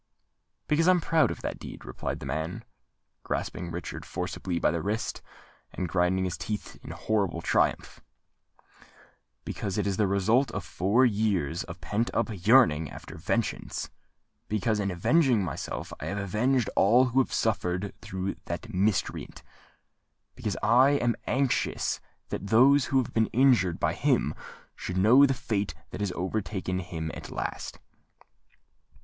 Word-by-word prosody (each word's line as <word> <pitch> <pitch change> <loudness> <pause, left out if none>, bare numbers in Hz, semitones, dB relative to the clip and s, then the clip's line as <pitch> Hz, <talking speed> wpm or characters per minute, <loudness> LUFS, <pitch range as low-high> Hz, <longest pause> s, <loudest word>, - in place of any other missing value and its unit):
"Because 165 +3 +2
I - - +8
am 180 - +2
proud 165 -1 +3
of - - -6
that - - -4
deed," - - -9
replied - - -5
the - - -6
man, 80 +3 -3 0.6
grasping 85 0 -3
Richard 85 +1 -6
forcibly 90 -3 -4
by - - +2
the 85 -1 -2
wrist, 105 +6 -2 0.5
and 90 - -3
grinding 90 +2 +1
his 90 - -3
teeth 105 -2 -5
in - - -9
horrible 100 -6 -1
triumph;—"because 100 -1 -5
it 105 - 0
is 100 -2 -1
the 105 - +3
result 110 +7 +2
of 105 - -3
four 105 +9 +2
years 100 - 0
of 85 0 -9
pent 105 +8 -1
up - - +1 0.2
yearning 80 - +5
after - - -10
vengeance;—because, 105 +2 -3
in 100 -1 0
avenging 120 - +3
myself, 80 -7 -5
I - - -5
have 100 - -3
avenged 110 +6 +1
all 120 +6 +5
who 130 +2 +2
have 130 - +1
suffered 95 -2 -1
through 95 +1 -4
that - - -5
miscreant;—because 95 +1 -4
I 125 +6 +5
am 120 -4 +1
anxious 135 0 0 0.3
that 100 - -4
those 130 +6 +5
who 135 - +1
have 130 - 0
been 110 -1 +3
injured 115 -9 +3
by - - +1
him - - +1 0.4
should 90 - -5
know 120 +9 +7
the 135 - 0
fate 105 -5 -2 0.2
that - - -6
has 100 -3 0
overtaken 95 0 -2
him 80 -3 -5
at - - -8
last." - - -4
100 Hz, 145 wpm, -28 LUFS, 90-120 Hz, 0.6 s, I